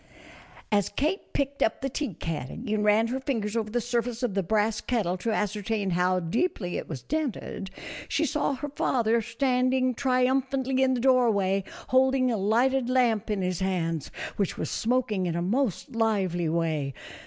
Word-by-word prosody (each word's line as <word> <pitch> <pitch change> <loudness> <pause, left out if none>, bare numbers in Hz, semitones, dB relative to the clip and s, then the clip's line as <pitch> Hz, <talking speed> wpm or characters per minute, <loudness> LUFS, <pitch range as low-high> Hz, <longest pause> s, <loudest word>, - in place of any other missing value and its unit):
As 205 -2 +2
Kate 310 - -2
picked 280 0 -2
up 220 - +1
the 270 - 0
tea 270 - -3
caddy 160 +5 -4
and 210 -1 +1
ran 210 +2 +4
her 260 +2 -1
fingers 230 -6 -2
over 220 -2 -1
the 240 +3 0
surface 240 0 -2
of 240 -5 0
the 195 - +1
brass 210 +3 +1
kettle 210 -8 0
to 230 - -3
ascer 210 -1 -1
tain 205 -2 -1
how 180 +1 +2
deeply 185 - -1
it - - -4
was 135 -7 -6
dented, 270 - -3 0.4
she 315 - +1
saw 285 0 0
her 290 +3 -5
father 235 -5 +1
standing 255 +2 +1
triumphantly 260 +1 +1
in 260 -1 +3
the - - -1
doorway 220 -7 +3 0.3
holding 260 0 +3
a 225 - 0
lighted 240 +6 +2
lamp 235 -4 +2
in 205 -3 0
his 180 -2 -1
hands, 165 -5 -1 0.3
which 200 -3 -1
was - - -3
smoking 225 -6 0
in 170 - -2
a 170 - -1
most 245 - 0
lively 190 -7 +1
way. 155 -5 -1
225 Hz, 175 wpm, -27 LUFS, 195-260 Hz, 0.4 s, ran